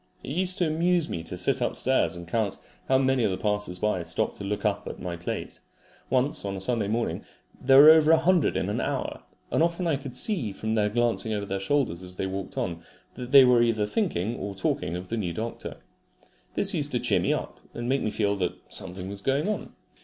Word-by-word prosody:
It -, -, -6 dB
used 185 Hz, +4 st, +2 dB
to 175 Hz, -, +2 dB
amuse 165 Hz, +1 st, +1 dB
me 85 Hz, -, -4 dB
to 80 Hz, -, -7 dB
sit -, -, +1 dB
upstairs 85 Hz, -, +1 dB
and 85 Hz, -1 st, -9 dB
count 105 Hz, +2 st, -1 dB, 0.3 s
how 130 Hz, -, +4 dB
many 130 Hz, -2 st, +2 dB
of -, -, +2 dB
the 95 Hz, -, -2 dB
passers 105 Hz, -2 st, -1 dB
by 105 Hz, -1 st, 0 dB
stopped 80 Hz, -1 st, -2 dB
to -, -, -7 dB
look 105 Hz, +2 st, -3 dB
at 105 Hz, -1 st, -2 dB
my 90 Hz, -2 st, -4 dB
plate. 85 Hz, +1 st, -5 dB, 0.5 s
Once 130 Hz, +2 st, +1 dB
(on 100 Hz, -1 st, -3 dB
a -, -, -5 dB
Sunday 105 Hz, +1 st, 0 dB
morning) 115 Hz, +3 st, -2 dB, 0.4 s
there 135 Hz, +1 st, +6 dB
were 150 Hz, +2 st, +11 dB
over 160 Hz, -1 st, +5 dB
a 165 Hz, -, +7 dB
hundred 180 Hz, -3 st, +2 dB
in -, -, -1 dB
an -, -, -1 dB
hour, -, -, -3 dB, 0.3 s
and -, -, +2 dB
often 170 Hz, +2 st, +1 dB
I 160 Hz, -4 st, +1 dB
could 135 Hz, -2 st, -8 dB
see 140 Hz, -, 0 dB
from 110 Hz, +3 st, -3 dB
their 105 Hz, -2 st, +2 dB
glancing 115 Hz, 0 st, 0 dB
over 100 Hz, -1 st, -2 dB
their 95 Hz, 0 st, -3 dB
shoulders 95 Hz, -5 st, 0 dB
as 90 Hz, 0 st, -6 dB
they 95 Hz, -, -2 dB
walked 95 Hz, 0 st, -5 dB
on, 85 Hz, -2 st, -2 dB, 0.3 s
that 125 Hz, -1 st, -8 dB
they 135 Hz, -2 st, +9 dB
were 125 Hz, -1 st, +5 dB, 0.2 s
thinking 115 Hz, -, -1 dB
or 100 Hz, 0 st, -5 dB
talking 95 Hz, -2 st, -1 dB
of 90 Hz, +1 st, -7 dB
the 115 Hz, -, -2 dB
new 90 Hz, -6 st, -2 dB
doctor. 115 Hz, +6 st, -5 dB, 0.8 s
This -, -, +1 dB
used -, -, -1 dB
to -, -, +1 dB
cheer -, -, +2 dB
me -, -, 0 dB
up, -, -, -3 dB, 0.2 s
and 120 Hz, 0 st, -4 dB
make 135 Hz, +2 st, +1 dB
me -, -, 0 dB
feel 105 Hz, -1 st, 0 dB
that 90 Hz, -2 st, -1 dB, 0.2 s
something 90 Hz, +1 st, -4 dB
was 100 Hz, 0 st, -6 dB
going 140 Hz, -, 0 dB
on. 215 Hz, -, -4 dB
110 Hz, 225 wpm, -26 LUFS, 95-140 Hz, 0.8 s, were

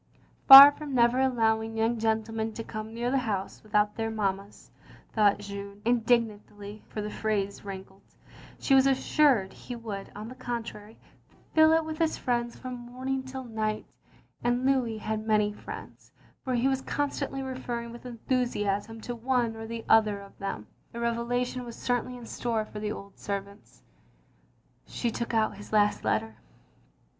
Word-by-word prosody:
Far 275 Hz, +1 st, +13 dB
from 290 Hz, -2 st, -6 dB
never 240 Hz, +1 st, +4 dB
allowing 225 Hz, -3 st, +1 dB
young 225 Hz, +1 st, +1 dB
gentlemen 220 Hz, 0 st, -1 dB
to 225 Hz, -, -6 dB
come 215 Hz, 0 st, -7 dB
near 240 Hz, +2 st, -2 dB
the 270 Hz, -, +2 dB
house 205 Hz, -6 st, -3 dB
without 210 Hz, -1 st, +1 dB
their 225 Hz, -1 st, -1 dB
mammas, 200 Hz, -2 st, -4 dB, 0.4 s
thought 210 Hz, -2 st, +4 dB
Jeanne, 200 Hz, 0 st, -8 dB
indignantly 220 Hz, -3 st, 0 dB
(for 210 Hz, -, -4 dB
the 210 Hz, -, -5 dB
phrase 205 Hz, -2 st, -2 dB
ran 195 Hz, -1 st, -6 dB
kled), 190 Hz, +1 st, -23 dB, 0.6 s
she 275 Hz, -, +1 dB
was 265 Hz, 0 st, +6 dB
assured 265 Hz, -6 st, +3 dB
he 245 Hz, -, -8 dB
would, 215 Hz, -4 st, -7 dB
on 210 Hz, +1 st, -7 dB
the 250 Hz, -, -8 dB
contrary, 235 Hz, -4 st, -6 dB, 0.6 s
fill 315 Hz, 0 st, +6 dB
it 325 Hz, 0 st, +3 dB
with 315 Hz, 0 st, -6 dB
his 325 Hz, -1 st, +1 dB
friends 240 Hz, -1 st, -2 dB
from 255 Hz, -1 st, -7 dB
morning 255 Hz, +2 st, -4 dB
till 260 Hz, 0 st, -7 dB
night; 220 Hz, -3 st, -3 dB, 0.6 s
and 245 Hz, +1 st, +1 dB
Louis 255 Hz, -5 st, +1 dB
had 215 Hz, 0 st, -3 dB
many 210 Hz, -1 st, +2 dB
friends, -, -, -10 dB, 0.3 s
for 255 Hz, -1 st, -1 dB
he 245 Hz, +2 st, +2 dB
was 265 Hz, -1 st, 0 dB
constantly 280 Hz, -1 st, -2 dB
referring 245 Hz, -3 st, -5 dB
with 240 Hz, +1 st, -10 dB
enthusiasm 225 Hz, -3 st, -2 dB
to 245 Hz, -, -5 dB
one 240 Hz, -1 st, 0 dB
or 225 Hz, 0 st, -7 dB
the 230 Hz, 0 st, -6 dB
other 215 Hz, -2 st, +4 dB
of 200 Hz, 0 st, -13 dB
them. 195 Hz, -, -4 dB, 0.3 s
A -, -, -4 dB
revelation 245 Hz, +2 st, -1 dB
was 235 Hz, -1 st, -8 dB
certainly 245 Hz, 0 st, -2 dB
in 240 Hz, -, -10 dB
store 225 Hz, -2 st, -2 dB
for 210 Hz, -, -8 dB
the 210 Hz, 0 st, -3 dB
old 200 Hz, -2 st, -9 dB
servants. 200 Hz, 0 st, -7 dB, 1.0 s
She 235 Hz, -, -2 dB
took 235 Hz, +1 st, -3 dB
out 215 Hz, -2 st, +1 dB
his 205 Hz, -, -11 dB
last 210 Hz, -1 st, +2 dB
letter. 110 Hz, +1 st, -1 dB
225 Hz, 165 wpm, -28 LUFS, 210-250 Hz, 1.0 s, Far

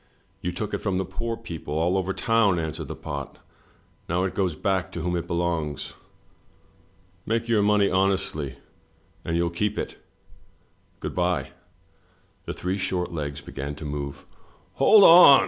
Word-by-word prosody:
"You 90 Hz, -, -2 dB
took 105 Hz, +4 st, -4 dB
it -, -, 0 dB
from 100 Hz, -3 st, -1 dB
the 95 Hz, -, -1 dB
poor 115 Hz, +5 st, -4 dB
people 80 Hz, -9 st, -6 dB
all 85 Hz, +3 st, +2 dB
over 95 Hz, 0 st, 0 dB
town," 115 Hz, -3 st, +2 dB
answered 80 Hz, -2 st, -3 dB
the -, -, -5 dB
pot. -, -, -6 dB, 0.7 s
"Now 90 Hz, +2 st, +1 dB
it 95 Hz, -, -1 dB
goes 95 Hz, -5 st, 0 dB
back 95 Hz, 0 st, -1 dB
to 85 Hz, -, -4 dB
whom 90 Hz, +1 st, -1 dB
it 85 Hz, 0 st, -3 dB
belongs. 85 Hz, -4 st, -2 dB, 1.3 s
Make 115 Hz, +1 st, -1 dB
your 115 Hz, -3 st, +3 dB
money 105 Hz, -1 st, +4 dB
honestly, 95 Hz, -7 st, 0 dB, 0.7 s
and 80 Hz, -, -1 dB
you'll 85 Hz, 0 st, +1 dB
keep 105 Hz, +4 st, -1 dB
it -, -, -4 dB, 0.6 s
— -, -, -38 dB
Good -, -, -4 dB
bye." -, -, 0 dB, 0.9 s
The -, -, -4 dB
three 95 Hz, +2 st, -2 dB
short 90 Hz, -2 st, -1 dB
legs 75 Hz, -3 st, -4 dB
began 70 Hz, +1 st, -6 dB
to 80 Hz, -, -8 dB
move. 70 Hz, -1 st, -5 dB, 0.5 s
"Hold 215 Hz, -2 st, +7 dB
on!" 165 Hz, -6 st, +10 dB
90 Hz, 160 wpm, -25 LUFS, 80-100 Hz, 1.3 s, on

